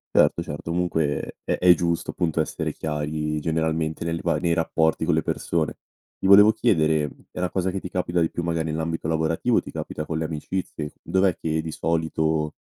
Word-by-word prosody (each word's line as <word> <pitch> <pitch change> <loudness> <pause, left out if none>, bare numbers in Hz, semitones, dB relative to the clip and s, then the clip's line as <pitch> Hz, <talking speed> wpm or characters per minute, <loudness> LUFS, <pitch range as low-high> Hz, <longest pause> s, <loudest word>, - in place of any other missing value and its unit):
Certo, - - +4
certo 75 +3 -6
comunque 80 -4 -1
è - - +1
è 90 0 +7
giusto, 85 0 -1
appunto, 80 -3 0
essere - - -3
chiari 75 0 -2
generalmente 80 0 -1
nelle 85 0 -2
va 85 - +1
nei 85 -1 +1
rapporti 80 -1 +1
con 90 - +2
le 80 - +2
persone. 80 -2 -1 0.4
Ti 95 - 0
volevo 105 +2 +9
chiedere, 80 -7 +2 0.3
è - - -15
una 90 0 0
cosa 95 0 -1
che 95 - -3
ti 90 - -7
capita 90 -1 -1
di 80 -1 +2
più 85 - -4
magari 80 -1 -1
nell'ambito 80 +1 -2
lavorativo 80 +8 +1
o - - +3
ti - - -10
capita 75 - -5
con 80 - -3
le 80 - -1
amicizie? 80 -1 -4
Dov'è 95 -2 +1
che 80 0 -1
di 80 0 -5
solito 80 -2 0
80 Hz, 195 wpm, -24 LUFS, 80-85 Hz, 0.4 s, volevo